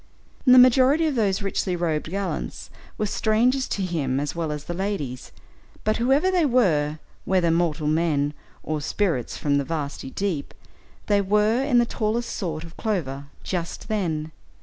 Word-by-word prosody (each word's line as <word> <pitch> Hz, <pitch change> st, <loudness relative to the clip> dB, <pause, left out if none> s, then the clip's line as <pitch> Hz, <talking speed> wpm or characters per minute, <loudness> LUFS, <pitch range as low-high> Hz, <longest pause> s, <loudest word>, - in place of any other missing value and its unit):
The 255 Hz, 0 st, +8 dB
majority 260 Hz, +5 st, +6 dB
of 310 Hz, -, +1 dB
those 205 Hz, -4 st, +1 dB
richly 195 Hz, -2 st, -1 dB
robed 160 Hz, -3 st, -1 dB
gallants 195 Hz, +2 st, -4 dB, 0.3 s
were 215 Hz, -, 0 dB
strangers 235 Hz, +5 st, +1 dB
to 195 Hz, -, -2 dB
him 140 Hz, -7 st, -1 dB
as 145 Hz, 0 st, -2 dB
well 165 Hz, -2 st, -2 dB
as 150 Hz, -1 st, -5 dB
the 175 Hz, -, -5 dB
ladies, 175 Hz, -10 st, -4 dB, 0.5 s
but 215 Hz, 0 st, +1 dB
whoever 270 Hz, +10 st, +3 dB
they 360 Hz, -2 st, +3 dB
were, 170 Hz, -, +2 dB, 0.3 s
whether 180 Hz, -3 st, +2 dB
mortal 165 Hz, -2 st, 0 dB
men 150 Hz, -2 st, +1 dB, 0.3 s
or 155 Hz, -1 st, -2 dB
"spirits 160 Hz, -, -1 dB
from 140 Hz, -1 st, +1 dB
the -, -, 0 dB
vasty 145 Hz, -3 st, -4 dB
deep," 175 Hz, -2 st, -3 dB, 0.5 s
they 205 Hz, -1 st, +3 dB
were 210 Hz, +5 st, +2 dB
in 275 Hz, -3 st, +2 dB
the 240 Hz, -, +5 dB
tallest 230 Hz, +1 st, -2 dB
sort 160 Hz, -5 st, -3 dB
of 165 Hz, 0 st, -12 dB
clover 145 Hz, -, -2 dB, 0.2 s
just 175 Hz, +4 st, -4 dB
then. 160 Hz, -7 st, -1 dB
185 Hz, 160 wpm, -24 LUFS, 155-220 Hz, 0.5 s, The